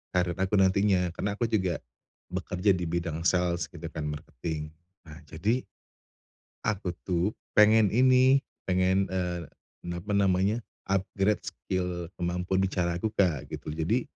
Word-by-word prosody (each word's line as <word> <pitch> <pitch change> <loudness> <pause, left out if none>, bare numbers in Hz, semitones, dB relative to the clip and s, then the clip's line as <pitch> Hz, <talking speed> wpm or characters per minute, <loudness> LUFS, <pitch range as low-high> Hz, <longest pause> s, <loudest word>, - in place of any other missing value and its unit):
karir 90 -1 +2
aku 95 +2 +1
nantinya 95 -2 +3
karena 100 0 -2
aku 115 +2 0
juga 95 -5 +1 0.5
bekerja 90 +3 +1
di 90 - -3
bidang 85 -1 -2
sales 90 -1 +1
gitu 85 -1 -7
kan, 75 -2 -4
marketing. 75 +1 -5 0.4
Nah 75 +1 -10
jadi, 100 - 0 1.1
aku 100 -3 -1 0.2
tuh 90 +1 +1 0.2
pengen 105 0 +6
ini, 130 +2 +5 0.2
pengen, 95 +1 +2
eee, 90 -2 -2 0.5
apa 85 +4 -5
namanya, 100 +2 +3 0.3
upgrade 95 +1 +1
skill 90 -2 -3
kemampuan 90 +2 -1
bicara 90 -3 0
aku, 110 +5 -1
Kak, 85 -9 +1
gitu. - - -6
Jadi, 85 +11 0
90 Hz, 130 wpm, -28 LUFS, 85-100 Hz, 1.1 s, pengen